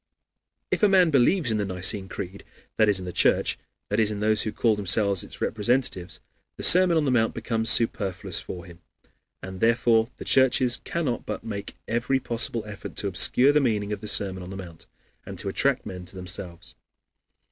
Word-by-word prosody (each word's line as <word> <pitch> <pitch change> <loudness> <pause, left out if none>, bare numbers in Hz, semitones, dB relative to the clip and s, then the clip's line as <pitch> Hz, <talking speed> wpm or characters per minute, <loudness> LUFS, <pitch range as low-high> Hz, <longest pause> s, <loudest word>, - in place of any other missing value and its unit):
If - - 0
a 210 - +5
man 185 -4 +4
believes 140 +1 +2
in 110 - 0
the - - 0
Nicene 95 +1 +1
Creed, 100 0 -7 0.3
that 110 -1 +4
is, 100 - +2
in 95 - -7
the 90 - -6
Church, - - +2 0.3
that 105 - 0
is, 110 -2 +3
in 105 -1 -4
those 110 0 +1
who 110 - -2
call 115 -1 +1
themselves 100 -1 +1
its - - -11
representatives, 110 -5 -1 0.4
the - - -6
Sermon 180 -2 +6
on 155 - +1
the 135 - +1
Mount 115 -3 +1
becomes 115 0 -1
superfluous 105 -6 +2
for 90 -2 -8
him. 85 0 -15 0.6
And 95 0 -8
therefore 115 0 +2
the - - -9
churches 130 -1 +3
cannot 150 -8 -3
but - - -5
make 100 -2 -7
every 120 +4 0
possible 115 -2 -1
effort 105 -2 -9
to 100 - 0
obscure 100 +8 +4
the 150 0 +3
meaning 105 -5 -1
of 105 - -6
the 105 - -7
Sermon 95 -2 -2
on 90 - -9
the 95 - -7
Mount, 85 -4 -11 0.4
and - - -9
to - - -4
attract - - 0
men 90 -1 -8
to 95 - -14
themselves. 90 -1 -9
105 Hz, 195 wpm, -25 LUFS, 95-120 Hz, 0.6 s, Sermon